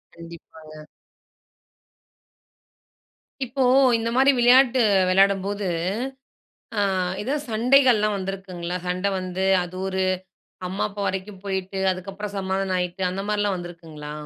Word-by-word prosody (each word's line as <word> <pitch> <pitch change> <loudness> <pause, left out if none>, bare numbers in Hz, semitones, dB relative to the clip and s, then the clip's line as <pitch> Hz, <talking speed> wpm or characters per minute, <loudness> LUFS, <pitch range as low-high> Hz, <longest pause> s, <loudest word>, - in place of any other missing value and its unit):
கண்டிப்பாங்க. 160 -2 -12 2.6
இப்போ 260 +2 -1 0.3
இந்த 230 0 -2
மாரி 270 +2 +5
விளையாட்டு 250 +1 +5 0.3
வெளையாடும்போது, 195 +1 +2 1.1
அ - - +3 0.4
எதா 260 +7 -1
சண்டைகள்லாம் 230 -2 +3
வந்திருக்குங்களா? 185 -2 -5
சண்டை 185 +2 0
வந்து, 185 +1 -3 0.2
அது 175 +1 -9
ஒரு 190 0 -1 0.7
அம்மா, 190 +2 -2
அப்பா 205 0 -6
வரைக்கும் 190 0 -5
போயிட்டு, 190 0 -3
அதுக்கப்புறம் 195 +2 -7
சமாதானம் 190 0 -1
ஆயிட்டு, 180 +1 -3
அந்த 190 +2 -4
மாரிலாம் 205 -2 0
வந்திருக்குங்களா? 165 -4 -9
195 Hz, 100 wpm, -23 LUFS, 180-210 Hz, 2.6 s, மாரி